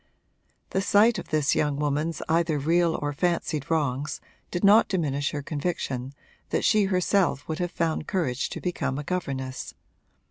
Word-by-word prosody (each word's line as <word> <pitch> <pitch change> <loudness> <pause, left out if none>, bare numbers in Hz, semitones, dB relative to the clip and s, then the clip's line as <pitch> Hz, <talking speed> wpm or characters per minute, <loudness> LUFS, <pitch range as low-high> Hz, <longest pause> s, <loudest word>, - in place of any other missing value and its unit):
The 190 - +1
sight 210 +4 +4
of - - -8
this 150 -3 +2
young 150 -2 +1
woman's 150 +2 -1
either 165 -1 +2
real 165 +3 +2
or 145 0 -1
fancied 160 -3 -1
wrongs 145 -3 -1 0.3
did 175 - -3
not 205 +3 +7
diminish 145 -6 0
her 145 -1 -4
conviction 140 -4 -3 0.3
that - - 0
she 210 -2 +4
herself 185 -5 +1
would 160 +2 -3
have 175 0 -1
found 165 -2 -1
courage 145 -9 -1
to - - -5
become 170 -6 -2
a 150 - -3
governess. 135 -6 -4
155 Hz, 155 wpm, -26 LUFS, 140-175 Hz, 0.3 s, not